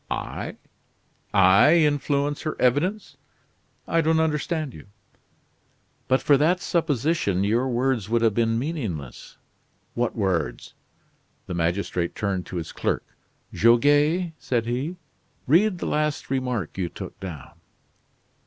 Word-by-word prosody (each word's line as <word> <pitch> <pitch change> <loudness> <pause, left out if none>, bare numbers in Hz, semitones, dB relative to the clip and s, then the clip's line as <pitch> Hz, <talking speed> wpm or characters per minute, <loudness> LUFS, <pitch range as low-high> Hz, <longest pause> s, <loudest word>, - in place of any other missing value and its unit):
"I - - -4 0.7
I 100 - +6
influence 145 -2 +1
her 155 - -4
evidence! 160 - 0 0.7
I 165 - +2
don't 160 0 +2
understand 155 -2 -1
you." - - -12 1.2
"But 130 - +2
for 145 - +5
that 165 +6 +2
supposition, 155 - 0
your 115 +6 +1
words 120 -4 0
would 115 0 +1
have 115 -2 +3
been 115 0 +1
meaningless?" 115 - -5 0.6
"What 120 -1 -1
words?" 95 -7 -2 0.7
The - - -5
magistrate 85 0 -1
turned 95 -3 -2
to - - -8
his 80 -2 -4
clerk: - - -2 0.5
"Goguet," 145 - +3
said 125 -4 -1
he, 130 +9 -2 0.5
"read 185 +7 +3
the - - -5
last 150 -2 -1
remark 125 - -2
you 90 -2 -1
took - - -9
down." 85 -7 -8
130 Hz, 120 wpm, -24 LUFS, 100-155 Hz, 1.2 s, I